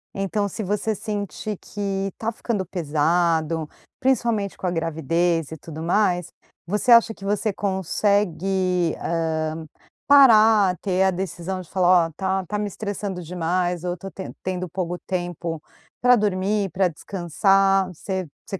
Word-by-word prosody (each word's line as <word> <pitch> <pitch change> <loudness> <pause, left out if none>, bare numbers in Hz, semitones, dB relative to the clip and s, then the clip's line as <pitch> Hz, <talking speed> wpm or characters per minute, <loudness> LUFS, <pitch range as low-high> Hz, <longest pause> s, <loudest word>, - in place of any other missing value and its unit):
Então, 200 +1 -1
se 215 - -5
você 210 +2 -1
sentir 210 0 -4
que 195 -1 -3
tá 225 +1 -2
ficando 215 -4 -3
pesado, 160 -1 0 0.3
principalmente 230 -6 0
com - - -6
a 180 - +1
gravidez 165 0 0
e 160 - -6
tudo 160 +1 -8
mais, 180 -2 +1 0.3
você 210 +7 +1
acha 230 -1 +7
que 195 - -15
você 205 +1 0
consegue, 190 -2 0
hã, 160 -1 -2 0.4
parar, 220 -8 +6
ter 190 -1 +1
a 190 - +3
decisão 185 0 -4
de 175 - -14
falar: 180 -2 +4
"Ó, - - -12
tá 190 0 0
tá 210 - -2
me 210 - -1
estressando 200 -2 -4
demais 175 +1 -1
ou 180 - -1
eu 180 - -4
to 195 +3 -8
ten 190 - -8
tendo 185 -1 -3
pouco 175 0 -3
tempo 175 -3 -3 0.4
pra 250 0 +6
dormir, 200 -1 0
pra 190 -1 +2
descansar"? 195 +3 +1
Você 185 +1 -4 0.2
você 195 - -6
185 Hz, 150 wpm, -23 LUFS, 170-205 Hz, 0.4 s, acha